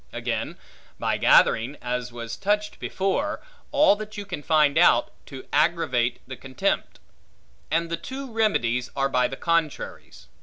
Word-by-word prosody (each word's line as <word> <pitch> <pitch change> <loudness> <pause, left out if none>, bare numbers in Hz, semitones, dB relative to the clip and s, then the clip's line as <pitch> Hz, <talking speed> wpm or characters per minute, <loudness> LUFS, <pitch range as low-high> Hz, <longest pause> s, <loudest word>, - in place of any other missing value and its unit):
Again, - - -3 0.4
by - - -1
gathering 125 +6 +4
(as 125 0 -3
was 115 -1 -6
touched 210 +1 -1
before) 280 +11 -1 0.3
all 285 -7 +5
that 215 0 -8
you 205 - -5
can 180 -6 -6
find 150 -2 +3
out, 170 +2 +4 0.2
to 135 -2 -9
aggravate 125 -8 +1
the 130 - -6
contempt. 130 -1 -2 0.7
And 165 +2 +1
the 170 - -1
two 260 +7 -7
remedies 125 - +1
are 135 0 +1
by 125 -2 +2
the 135 - -7
contraries. 165 -3 -2
155 Hz, 145 wpm, -25 LUFS, 125-205 Hz, 0.7 s, all